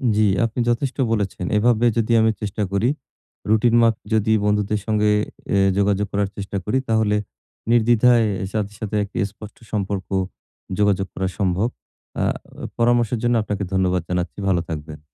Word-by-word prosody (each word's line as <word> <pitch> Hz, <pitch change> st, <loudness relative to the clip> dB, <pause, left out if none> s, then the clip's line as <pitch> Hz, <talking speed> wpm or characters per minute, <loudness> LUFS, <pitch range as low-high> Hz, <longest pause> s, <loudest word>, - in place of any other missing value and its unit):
জি, 110 Hz, -, +3 dB, 0.2 s
আপনি 115 Hz, +2 st, -4 dB
যথেষ্ট 125 Hz, +3 st, -1 dB
বলেছেন। 100 Hz, -4 st, -1 dB
এভাবে 120 Hz, +1 st, +3 dB
যদি 115 Hz, +1 st, +1 dB
আমি 110 Hz, 0 st, +4 dB
চেষ্টা 105 Hz, 0 st, -2 dB
করি, 100 Hz, +5 st, +2 dB, 0.6 s
রুটিন 110 Hz, +2 st, +3 dB
মাপ 115 Hz, -1 st, +4 dB, 0.2 s
যদি 110 Hz, 0 st, +2 dB
বন্ধুদের 105 Hz, 0 st, +1 dB
সঙ্গে 105 Hz, -1 st, +2 dB, 0.5 s
এ -, -, +4 dB, 0.2 s
যোগাযোগ 100 Hz, 0 st, +1 dB
করার 100 Hz, -1 st, 0 dB
চেষ্টা 100 Hz, 0 st, -4 dB
করি, 115 Hz, +5 st, +1 dB
তাহলে 110 Hz, -2 st, +2 dB, 0.6 s
নির্দ্বিধায় 120 Hz, 0 st, +4 dB, 0.3 s
সাথে 105 Hz, -1 st, -2 dB
সাথে 105 Hz, -1 st, -4 dB
একটি 100 Hz, -, -8 dB
স্পষ্ট 105 Hz, 0 st, -12 dB
সম্পর্ক 100 Hz, -2 st, -2 dB, 0.7 s
যোগাযোগ 100 Hz, -2 st, +2 dB
করা 95 Hz, -, -2 dB
সম্ভব। 95 Hz, +3 st, +1 dB, 0.5 s
আ -, -, +2 dB, 0.4 s
অ -, -, -5 dB
পরামর্শের 120 Hz, -1 st, +2 dB
জন্য 120 Hz, 0 st, +2 dB
আপনাকে 105 Hz, -1 st, -3 dB
ধন্যবাদ 90 Hz, -1 st, +1 dB
জানাচ্ছি। 90 Hz, +2 st, -2 dB
ভালো 90 Hz, -3 st, +2 dB
থাকবেন। 75 Hz, -1 st, -6 dB
105 Hz, 150 wpm, -21 LUFS, 100-115 Hz, 0.7 s, আমি